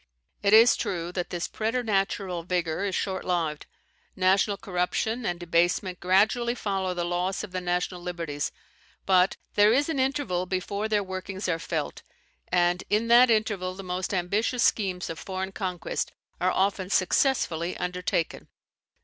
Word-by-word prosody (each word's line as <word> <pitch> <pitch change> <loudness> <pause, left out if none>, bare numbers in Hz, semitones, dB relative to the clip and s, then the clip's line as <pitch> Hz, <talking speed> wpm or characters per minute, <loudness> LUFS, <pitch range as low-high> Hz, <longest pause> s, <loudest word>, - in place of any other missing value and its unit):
It 200 - +2
is 225 +2 +8
true 175 -2 -3
that 180 -1 -3
this 175 -1 -3
preter 225 +3 -1
natural 195 -4 -1
vigour 175 0 -1
is 195 -3 -1
short 190 -1 -2
lived: 165 -4 -1 0.5
national 195 +2 +3
corruption 210 +5 -1
and 175 -1 -2
debasement 175 +2 +1
gradually 220 +6 +2
follow 190 -5 -2
the 175 - -1
loss 180 +3 -1
of 210 - -7
the 185 0 -3
national 180 0 -1
liberties; 165 -5 -3 0.5
but 185 -1 +4 0.2
there 205 +1 +5
is 285 +6 +2
an 310 -4 -1
interval 260 -10 0
before 200 +3 -2
their 210 -2 +1
workings 190 +1 -5
are 165 -2 0
felt, 165 - -3 0.5
and 175 0 +2
in 220 +3 +1
that 240 +1 +7
interval 205 -5 0
the 195 - -8
most 180 0 -3
ambitious 205 +6 0
schemes 185 -4 +1
of 165 - -6
foreign 190 0 -4
conquest 185 -3 -3 0.3
are 180 - +2
often 190 0 0
successfully 185 - +1
undertaken. 180 -2 -2
185 Hz, 150 wpm, -27 LUFS, 180-205 Hz, 0.5 s, is